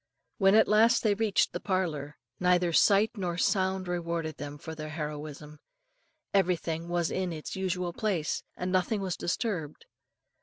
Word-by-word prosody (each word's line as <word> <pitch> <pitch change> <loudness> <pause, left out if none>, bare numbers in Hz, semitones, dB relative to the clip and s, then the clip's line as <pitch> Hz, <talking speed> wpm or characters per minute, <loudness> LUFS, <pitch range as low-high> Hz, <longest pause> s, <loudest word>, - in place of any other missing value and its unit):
When 195 0 +5
at 220 - +6
last 225 +3 +4
they 215 -2 +4
reached 210 -1 +1
the - - -3
parlour, 160 -7 -2 0.2
neither 180 -1 +3
sight 205 +5 +5
nor 180 -4 -3
sound 190 -1 +1
rewarded 170 -3 -3
them 145 0 -6
for 160 +1 -8
their 155 -1 -6
heroism. 150 -1 -6 0.7
Everything 170 -3 0
was 175 -1 0
in 185 -1 -1
its 155 -2 -6
usual 180 -2 -2
place, 185 -8 -1 0.2
and 180 0 -2
nothing 190 +3 +1
was 185 -3 -2
disturbed. 175 - -3
180 Hz, 150 wpm, -29 LUFS, 160-195 Hz, 0.7 s, at